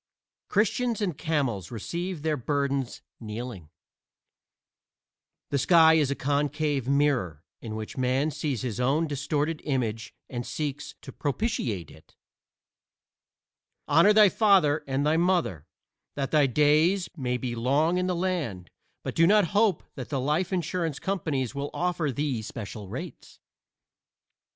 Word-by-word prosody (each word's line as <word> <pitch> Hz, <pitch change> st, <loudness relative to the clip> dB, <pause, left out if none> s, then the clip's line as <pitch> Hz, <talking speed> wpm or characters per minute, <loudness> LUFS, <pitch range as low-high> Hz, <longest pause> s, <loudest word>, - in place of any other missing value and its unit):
Christians 230 Hz, +2 st, +1 dB
and 190 Hz, -7 st, -1 dB
camels 135 Hz, -, -1 dB
receive 170 Hz, -, -4 dB
their 155 Hz, -1 st, +1 dB
burdens 140 Hz, -1 st, -2 dB, 0.2 s
kneeling. 110 Hz, -6 st, -7 dB, 1.8 s
The 140 Hz, -, +1 dB
sky 160 Hz, +1 st, +6 dB
is 155 Hz, -4 st, +3 dB
a 140 Hz, -, -1 dB
concave 145 Hz, -1 st, -1 dB
mirror 135 Hz, -, +1 dB, 0.2 s
in 110 Hz, -2 st, -6 dB
which 110 Hz, +3 st, -6 dB
Man 130 Hz, +4 st, +1 dB
sees 140 Hz, -6 st, -3 dB
his 120 Hz, -2 st, -3 dB
own 140 Hz, +6 st, +2 dB
distorted 150 Hz, +2 st, -2 dB
image 120 Hz, -5 st, -2 dB
and 120 Hz, -2 st, -4 dB
seeks 145 Hz, +1 st, -4 dB
to 135 Hz, -, -8 dB
propitiate 130 Hz, -, -2 dB
it. 80 Hz, +1 st, -19 dB, 1.7 s
Honor 165 Hz, +8 st, +6 dB
thy 210 Hz, -1 st, +7 dB
father 180 Hz, -9 st, +3 dB
and 135 Hz, +1 st, 0 dB
thy 155 Hz, +2 st, +3 dB
mother 170 Hz, -, 0 dB, 0.5 s
that 135 Hz, -2 st, -2 dB
thy 150 Hz, -3 st, +4 dB
days 155 Hz, -, +3 dB
may 125 Hz, -5 st, -1 dB
be 125 Hz, -1 st, -4 dB
long 145 Hz, +9 st, +1 dB
in 180 Hz, -, 0 dB
the 180 Hz, -, 0 dB
land, 165 Hz, -, -2 dB, 0.3 s
but -, -, -4 dB
do 165 Hz, 0 st, +4 dB
not 205 Hz, -3 st, +4 dB
hope 205 Hz, -4 st, +3 dB
that 130 Hz, -4 st, -7 dB
the 140 Hz, -2 st, -1 dB
life 150 Hz, +8 st, 0 dB
insurance 170 Hz, -4 st, -1 dB
companies 155 Hz, -, -2 dB
will 140 Hz, 0 st, -3 dB
offer 175 Hz, -4 st, 0 dB
thee 135 Hz, -3 st, -2 dB
special 105 Hz, -1 st, -7 dB
rates. -, -, -8 dB
145 Hz, 135 wpm, -27 LUFS, 125-165 Hz, 1.8 s, thy